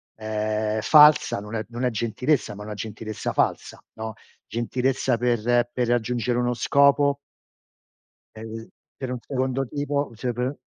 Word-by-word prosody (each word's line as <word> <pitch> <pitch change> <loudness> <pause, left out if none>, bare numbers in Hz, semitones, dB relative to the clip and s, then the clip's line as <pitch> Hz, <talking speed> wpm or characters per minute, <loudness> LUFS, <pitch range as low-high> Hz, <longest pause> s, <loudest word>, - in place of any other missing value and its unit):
ehm, 110 0 -2
falsa, 150 -4 +6
non 105 +2 -7
è 110 -1 -3
non 120 +1 -5
è 125 - +3
gentilezza, 115 +1 -1
ma 105 - -8
una 105 0 -6
gentilezza 110 +1 -5
falsa, - - -1
no, 110 0 -6 0.3
gentilezza 125 +1 0
per 120 0 +1
per 125 -2 0
raggiungere 120 0 0
uno 125 0 +1
scopo 140 +4 +3 1.2
ehm, 110 +1 -8
l - - -16 0.3
per 130 -2 -4
un 125 - -3
secondo 130 0 -1
tipo, 145 -1 -2
cioè, 125 +2 -3
pe 125 +4 -2
120 Hz, 145 wpm, -24 LUFS, 110-130 Hz, 1.2 s, falsa